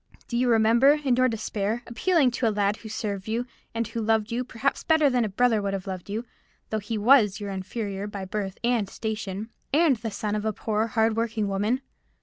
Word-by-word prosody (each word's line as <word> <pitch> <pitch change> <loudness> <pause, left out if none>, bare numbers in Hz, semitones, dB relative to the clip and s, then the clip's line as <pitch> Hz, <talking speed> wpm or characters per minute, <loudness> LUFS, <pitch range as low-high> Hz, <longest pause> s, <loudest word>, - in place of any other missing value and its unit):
Do 235 - -4
you 245 +1 +2
remember, 230 +5 +5
in 290 -5 +1
your 255 +1 +4
despair, 220 -1 -2
appealing 270 +3 +2
to 235 0 0
a - - +4
lad 205 0 +1
who 220 - -10
served 205 -2 -4
you, 230 +3 -1 0.3
and 230 -1 -1
who 230 0 -4
loved 220 0 +1
you, 240 +2 -1
better 255 - -18
perhaps 260 +4 0
than 285 -7 +3
a 215 - -1
brother 225 +1 +2
would 200 -1 -1
have 190 - -5
loved 185 -1 -6
you, 220 +4 -3 0.5
though 220 - 0
he 215 +2 -4
was 215 -3 +5
your 205 -1 -4
inferior 195 +1 -4
by 200 -2 -6
birth 195 0 -4
and 235 -5 +1
station, 220 -1 -4 0.2
and 295 -3 +4
the 225 +1 -4
son 210 0 -3
of 210 0 -1
a 220 0 0
poor, 220 +2 -1
hard 225 0 +2
working 225 -2 -1
woman? 205 +6 0
220 Hz, 215 wpm, -26 LUFS, 205-240 Hz, 0.5 s, remember